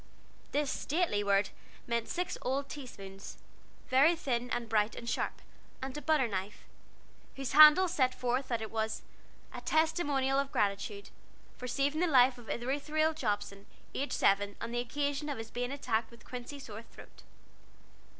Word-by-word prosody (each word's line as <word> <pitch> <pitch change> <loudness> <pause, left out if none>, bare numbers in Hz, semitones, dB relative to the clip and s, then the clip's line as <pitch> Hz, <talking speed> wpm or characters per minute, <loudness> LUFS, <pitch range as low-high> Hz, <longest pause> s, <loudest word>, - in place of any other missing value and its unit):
This 290 -1 0
stately 300 - 0
word 200 -1 +2 0.3
meant 235 -1 -1
six 360 0 -2
old 275 +2 -1
teaspoons, 195 -9 -9 0.5
very 285 +7 +5
thin 245 -6 -2
and 240 -1 -2
bright 215 0 +1
and 235 - -8
sharp, - - -2 0.4
and 265 0 -5
a 295 - -4
butter 295 -3 +2
knife, 200 0 -4 0.7
whose 270 -3 -4
handle 305 +6 +9
set 260 -7 +1
forth 250 +2 -1
that 230 -2 -1
it 220 - -6
was 220 -1 -2 0.5
"A - - -6
testimonial 290 -4 +2
of 280 0 -2
gratitude, 200 0 -1 0.4
for 250 - -7
saving 285 +5 0
the 360 - +3
life 255 -4 +5
of 235 - -13
Ithuriel 295 +5 0
Jobson, 205 -7 -3 0.3
aged 280 - -2
seven, 200 0 +2
on - - -5
the 240 - -1
occasion 285 +4 -2
of 285 - -3
his 225 0 -7
being 245 +1 -2
attacked 230 -5 -1
with 235 -2 -17
quinsy 250 +3 -7
sore 220 -5 -8
throat." 230 - -15
255 Hz, 160 wpm, -32 LUFS, 225-285 Hz, 0.7 s, handle